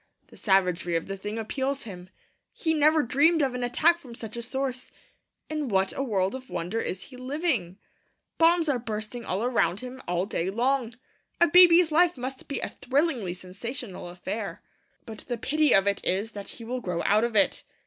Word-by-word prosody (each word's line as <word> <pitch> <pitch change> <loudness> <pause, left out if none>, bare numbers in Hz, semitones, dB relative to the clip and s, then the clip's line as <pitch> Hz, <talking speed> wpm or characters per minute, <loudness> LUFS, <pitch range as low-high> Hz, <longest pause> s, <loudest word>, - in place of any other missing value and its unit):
The - - -16
savagery 180 -4 +1
of 165 - -1
the 195 - -5
thing 210 +3 -5
appals 265 +5 -2
him; 185 -5 -9 0.4
he 320 -2 -1
never 310 0 +4
dreamed 300 +6 +3
of 265 -2 0
an 250 0 -3
attack 325 +8 +3
from 250 -7 -11
such 225 -2 -6
a 235 - -4
source. 255 +1 -4 0.6
In 305 -2 -3
what 190 -3 +1
a - - -2
world 195 -7 0
of 260 0 -8
wonder 180 +7 -3
is 185 -3 -3
he 255 - -10
living! 255 - -1 0.6
Bombs 335 0 +5
are 275 -4 +1
bursting 225 +1 -5
all 190 +4 -1
around 205 -7 +1
him 255 +1 -8
all 175 +1 0
day 185 -3 -2
long. 240 +2 0 0.4
A 345 - +7
baby's 350 0 +7
life 345 0 +4
must 260 +1 -6
be 280 - -3
a - - -1
thrillingly 260 - -1
sensational 195 +2 -7
affair. 195 +4 -5 0.4
But 220 -1 -9
the 240 -1 -2
pity 305 +5 +1
of 195 0 +5
it 200 0 0
is 200 +5 -1
that 205 -2 -8
he 230 - -9
will 250 +2 -4
grow 175 -4 -2
out 210 +2 +4
of 235 -2 -1
it. 205 - +3
240 Hz, 190 wpm, -27 LUFS, 195-275 Hz, 0.6 s, A